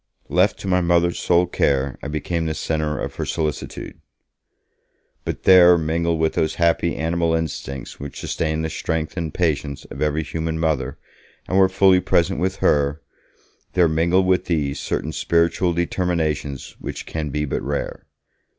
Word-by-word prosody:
Left 90 +4 +3
to - - -6
my 90 -1 +3
Mother's 85 0 +2
sole 90 0 +3
care, 70 -6 0
I - - -5
became 80 +2 -2
the 80 - -2
centre 75 0 -1
of - - -5
her - - -2
solicitude. 75 -2 -4 1.2
But - - -4
there 90 -2 +8
mingled 85 +1 0
with 80 0 +1
those 80 - 0
happy 85 0 +2
animal 80 0 0
instincts 70 -4 -5
which 70 0 -7
sustain 80 -1 -2
the 80 - -1
strength 80 0 -3
and 85 -4 -3
patience 75 -5 -1
of - - -7
every 75 +1 +1
human 80 +1 -3
mother 70 -5 -1 0.5
and 90 - -2
were 95 -1 +6
fully 95 -1 +5
present 90 0 +1
with 95 +2 0
her 75 +2 +2 0.7
there 90 -2 +4
mingled 85 +4 +2
with 90 -1 +2
these 75 -5 -1
certain 80 - -2
spiritual 85 +2 +1
determinations 80 -5 -2
which - - -6
can 80 -2 -4
be 75 +2 -1
but 70 - -2
rare. 70 +1 -4
80 Hz, 160 wpm, -22 LUFS, 75-85 Hz, 1.2 s, there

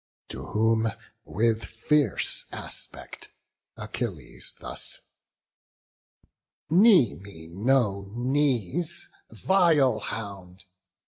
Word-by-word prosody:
To - - -6
whom, 110 +1 +2 0.4
with 115 +1 +1
fierce 150 -1 0
aspect, - - -7 0.5
Achilles 105 - -5
thus: - - -3 1.7
"Knee 180 - +6
me 80 -1 -10
no 100 -3 +1
knees, 140 - 0 0.2
vile 170 -8 +3
hound! 95 -4 -7
115 Hz, 70 wpm, -27 LUFS, 100-145 Hz, 1.7 s, Knee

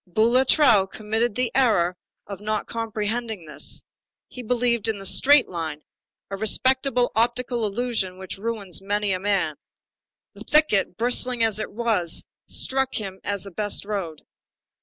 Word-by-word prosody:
Boulatruelle 235 - +4
committed 220 +2 -1
the 250 0 0
error 200 -9 +3 0.3
of 200 -2 -7
not 215 0 -2
comprehending 225 -3 -3
this. 150 - -5 0.5
He 250 - -8
believed 235 -2 +1
in 220 -2 -1
the 195 - -8
straight 280 +7 +5
line; 160 -4 -5 0.5
a 195 - -3
respectable 255 +3 +2
optical 240 0 +1
illusion 210 -4 -2
which 190 0 -7
ruins 205 -5 -2
many 205 +1 0
a 185 - 0
man. 190 -6 0 0.8
The - - -11
thicket, 255 - +2
bristling 245 +1 +1
as 220 -2 +1
it 215 - -4
was, 210 -7 0 0.2
struck 265 0 0
him 195 -3 -4
as 200 -1 -2
the 200 - -6
best 205 +2 -2
road. 190 -7 -4
215 Hz, 140 wpm, -24 LUFS, 195-240 Hz, 0.8 s, straight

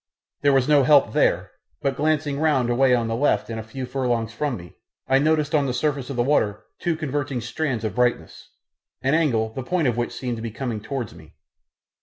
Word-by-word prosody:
There 145 - +4
was 135 -2 +3
no 150 -2 +5
help 140 +1 +5
there, - - +2 0.3
but 135 -1 0
glancing 145 -1 0
round 135 -6 +2
away 125 +1 +4
on 120 -2 0
the 115 - -1
left 115 -4 +1
and 110 - -4
a - - -5
few 130 +4 -6
furlongs 120 -4 -1
from 140 +1 -2
me, 85 -2 -12 0.3
I 135 +1 +4
noticed 150 0 +1
on 145 -3 +3
the 125 - -2
surface 140 -1 -1
of 140 - -4
the 120 - +2
water 115 -7 +1 0.2
two 175 -2 0
converging 145 -4 -2
strands 120 0 -2
of 110 -3 -2
brightness, 125 +2 -1 0.5
an 135 +2 +2
angle 115 -9 +1
the 130 - -4
point 160 +3 0
of 120 -2 0
which 120 - -1
seemed 125 -2 -4
to - - -6
be 115 - -4
coming 115 -1 -4
towards 115 0 -4
me. - - -16
130 Hz, 215 wpm, -23 LUFS, 120-145 Hz, 0.5 s, no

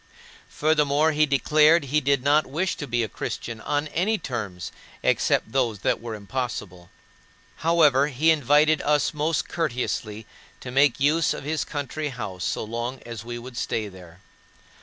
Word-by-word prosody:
Furthermore, 150 0 +2
he 155 0 +2
declared 150 +3 +4
he 145 +3 0
did 140 -2 +1
not 145 +2 +3
wish 165 +8 -1
to 145 - -5
be 120 -1 0
a - - -2
Christian 110 +3 -6
on 145 +6 -1
any 200 +8 0
terms 105 - -5 0.3
except - - +1
those 120 -6 0
that - - 0
were 115 -1 -5
impossible. 100 -5 -5 0.7
However, 150 -4 +4
he 150 +3 +3
invited 150 +1 +3
us 150 +1 +1
most 150 +1 -1
courteously 120 -8 -3 0.3
to 125 - -8
make 135 -1 +3
use 150 +3 +2
of - - -8
his 155 +2 -1
country 145 +1 -4
house 100 -8 -6
so - - -2
long 120 +4 -4
as 115 -2 -7
we 120 +1 -6
would 120 +1 -10
stay 110 -1 -2
there. 90 -2 -14
135 Hz, 160 wpm, -24 LUFS, 115-150 Hz, 0.7 s, declared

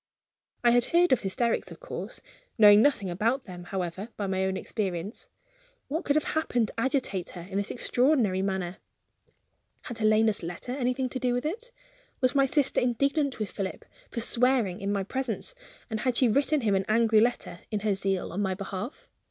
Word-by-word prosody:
I 240 - +6
had 245 0 +4
heard 350 +1 +3
of 260 - +5
hysterics, 225 +4 -1
of - - -11
course; - - -6 0.4
knowing 210 -1 +8
nothing 225 -9 +2
about 230 +9 0
them, 180 -4 -9
however, 190 +3 -4
by 205 - -2
my 190 0 0
own 190 0 -1
experience. 190 0 -4 0.6
What 320 +6 -2
could 285 - +2
have 305 - +3
happened 245 -8 0
to - - -8
agitate 240 -8 -1
her - - -6
in 195 0 -4
this 200 0 -1
extraordinary 245 -6 +2
manner? 190 -2 -2 1.1
Had 235 -2 -7
Helena's 215 0 +3
letter 175 +8 -6
anything 255 0 -1
to 260 - -4
do 250 -1 +1
with 245 - -2
it? 460 +10 -4 0.5
Was 255 0 +2
my 275 -1 +4
sister 285 0 +2
indignant 275 +3 +1
with 215 -2 -4
Philip 195 -2 -5 0.2
for 235 - -3
swearing 235 -6 +3
in 200 0 -1
my 200 -1 0
presence; 260 - -3 0.3
and 220 -2 -3
had 250 +1 0
she 255 - +4
written 280 +5 +2
him 215 -4 +1
an 190 0 +1
angry 220 0 +4
letter, 225 -6 0
in 210 -2 -2
her 210 -1 +1
zeal 195 -1 -1
on 195 - -2
my 190 -2 0
behalf? 195 +5 -6
225 Hz, 185 wpm, -28 LUFS, 195-260 Hz, 1.1 s, knowing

